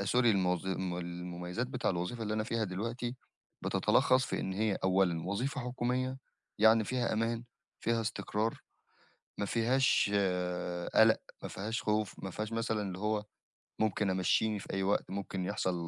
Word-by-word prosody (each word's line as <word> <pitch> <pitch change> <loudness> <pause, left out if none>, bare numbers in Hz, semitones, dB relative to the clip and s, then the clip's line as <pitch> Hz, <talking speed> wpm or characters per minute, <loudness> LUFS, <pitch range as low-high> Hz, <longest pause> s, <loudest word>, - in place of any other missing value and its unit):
آآ 100 - -1
sorry - - 0
الموظ 95 -4 +2
الم 95 -1 -1
المميّزات 90 +5 -4
بتاع 130 -4 -1
الوظيفة 90 +6 -2
اللي 110 0 -1
أنا 110 - 0
فيها 115 -1 0
دلوقتي 115 +6 -3 0.5
بتتلخّص 130 +1 +3
في - - -2
إن 95 - -2
هي 105 0 +1
أولًا 90 -3 +2
وظيفة 125 +9 -1
حكومية 125 +1 -1 0.4
يعني 110 +1 +6
فيها 125 +1 0
أمان، 115 +2 0 0.4
فيها 115 0 +1
استقرار، 105 +1 -1 0.8
ما 100 - 0
فيهاش 120 0 +3 0.8
قلق، - - +6 0.2
ما - - -4
فيهاش 110 +4 -3
خوف، 105 -1 0
ما 95 - -3
فيهاش 110 +4 -4
مثلًا 115 -2 0
اللي 95 -2 -4
هو 105 0 0 0.5
ممكن 105 -2 +1
أمشيني 105 +3 +2
في - - -8
أي 95 0 0
وقت، 100 0 +1
ممكن 95 -1 -3
يحصَل 90 0 0
105 Hz, 155 wpm, -32 LUFS, 95-115 Hz, 0.8 s, يعني